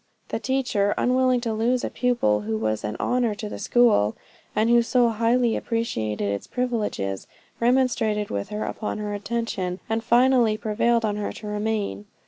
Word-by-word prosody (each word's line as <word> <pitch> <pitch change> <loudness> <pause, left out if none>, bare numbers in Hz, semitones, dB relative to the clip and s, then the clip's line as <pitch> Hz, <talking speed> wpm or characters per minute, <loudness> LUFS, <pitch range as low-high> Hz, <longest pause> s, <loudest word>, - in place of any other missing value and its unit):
The - - -2
teacher, 245 -7 0
unwilling 255 0 +2
to 230 -2 -2
lose 240 +3 +1
a - - -2
pupil 240 - +1
who 110 +1 -2
was 110 0 -1
an 105 0 -3
honor 245 -3 +1
to 210 +1 -6
the - - -7
school, 220 - +3 0.4
and 215 +1 +2
who 235 0 +5
so 240 0 +3
highly 230 +1 +2
appreciated 110 - -2
its 100 - -5
privileges, 215 - -2 0.3
remonstrated 235 -4 +1
with 100 0 -3
her 210 +1 -3
upon 215 - -4
her 210 -1 -4
intention, 205 -4 -3
and 225 0 -1
finally 240 -2 +4
prevailed 225 +2 +1
on 210 -1 -1
her 210 - -3
to 215 - -10
remain. 210 0 -2
220 Hz, 165 wpm, -24 LUFS, 205-240 Hz, 0.4 s, who